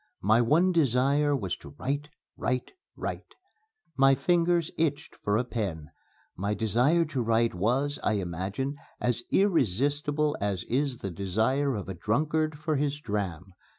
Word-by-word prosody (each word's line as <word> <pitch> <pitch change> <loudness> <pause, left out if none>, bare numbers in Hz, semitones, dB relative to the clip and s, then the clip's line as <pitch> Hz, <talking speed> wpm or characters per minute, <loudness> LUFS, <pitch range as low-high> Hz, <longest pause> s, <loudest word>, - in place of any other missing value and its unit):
My 110 +4 +5
one 165 +10 +4
desire 145 -1 +3
was 95 -9 -2
to 70 - -13
write, 145 +2 -2 0.3
write, 125 0 -2 0.2
write. - - -6 0.6
My 135 0 +5
fingers 170 +3 +2
itched 155 -3 -1
for 105 0 0
a 120 - +1
pen. 95 -11 -4 0.4
My 100 +3 -1
desire 125 - +2
to 145 -5 -2
write 115 0 +2
was, 125 +10 0
I 105 - +1
imagine, 100 - -3 0.2
as 120 -1 0
irresistible 145 - +2
as 100 -3 -1
is 135 0 -1
the 95 - -4
desire 110 - 0
of 100 - -5
a 95 - -4
drunkard 150 - 0
for 155 0 -1
his 145 +1 -1
dram. 95 - -4
130 Hz, 145 wpm, -28 LUFS, 105-145 Hz, 0.6 s, My